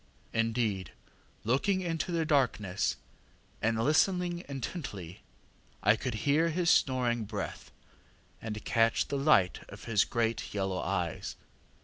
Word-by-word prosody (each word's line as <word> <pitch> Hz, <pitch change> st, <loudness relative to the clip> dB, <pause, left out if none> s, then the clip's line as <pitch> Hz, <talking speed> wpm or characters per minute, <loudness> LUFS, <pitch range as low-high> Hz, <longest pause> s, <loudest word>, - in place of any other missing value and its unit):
Indeed, 115 Hz, -5 st, 0 dB
on -, -, -30 dB, 0.4 s
looking 185 Hz, +9 st, +2 dB
into 165 Hz, -1 st, -2 dB
the 165 Hz, -2 st, +1 dB
darkness 120 Hz, -, +1 dB, 0.7 s
and 115 Hz, 0 st, +1 dB
listening 175 Hz, -, +2 dB
intently, 125 Hz, -, -6 dB, 0.6 s
I 105 Hz, -, +6 dB
could 120 Hz, 0 st, -3 dB
hear 155 Hz, +4 st, +4 dB
his 170 Hz, +1 st, +2 dB
snoring 120 Hz, -3 st, +2 dB
breath, -, -, -5 dB, 0.7 s
and 110 Hz, -1 st, -5 dB
catch 115 Hz, 0 st, +2 dB
the 140 Hz, -, -1 dB
light 135 Hz, -11 st, +4 dB
of -, -, -10 dB
his 105 Hz, -2 st, +3 dB
great 115 Hz, -2 st, -1 dB
yellow 95 Hz, -2 st, -1 dB
eyes. -, -, -2 dB
120 Hz, 120 wpm, -31 LUFS, 110-155 Hz, 0.7 s, I